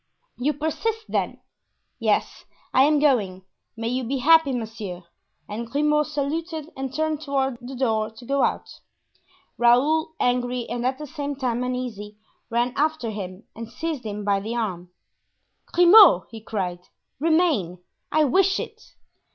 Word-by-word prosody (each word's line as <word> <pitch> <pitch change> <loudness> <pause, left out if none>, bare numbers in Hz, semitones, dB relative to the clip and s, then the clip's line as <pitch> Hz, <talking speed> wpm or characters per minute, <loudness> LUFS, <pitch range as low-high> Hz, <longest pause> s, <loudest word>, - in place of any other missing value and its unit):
"You 285 +4 +1
persist, 425 +10 -2
then?" - - -2 0.6
"Yes, - - 0 0.3
I 265 - +6
am 300 +1 +3
going; 210 -11 +1 0.3
may 225 0 -3
you 255 +1 -1
be 265 +4 -2
happy, 315 +2 +5
monsieur," 220 -7 -5 0.4
and 225 +3 -5
Grimaud 300 +2 +2
saluted 310 +2 -3
and 265 -1 -4
turned 310 +1 -1
toward 270 -4 -1
the 255 +2 -8
door 220 -4 0
to 225 +2 -14
go 275 +2 +1
out. - - 0 0.9
Raoul, 295 +7 +3
angry 245 -1 0
and 240 +1 -2
at 260 0 -1
the 300 - -7
same 285 -1 -5
time 250 -3 -1
uneasy, 240 -5 -4 0.3
ran 240 +1 0
after 295 -5 0
him 190 -1 -7
and 230 0 -7
seized 295 +3 -4
him 210 -1 -5
by 200 -1 +2
the 220 +4 -4
arm. 185 -7 -3 0.8
"Grimaud!" 355 - +8
he 225 -1 -9
cried; 185 -5 -3 0.4
"remain; 315 - +2 0.3
I 310 0 +4
wish 380 +7 +3
it." - - -7
255 Hz, 145 wpm, -24 LUFS, 225-300 Hz, 0.9 s, Grimaud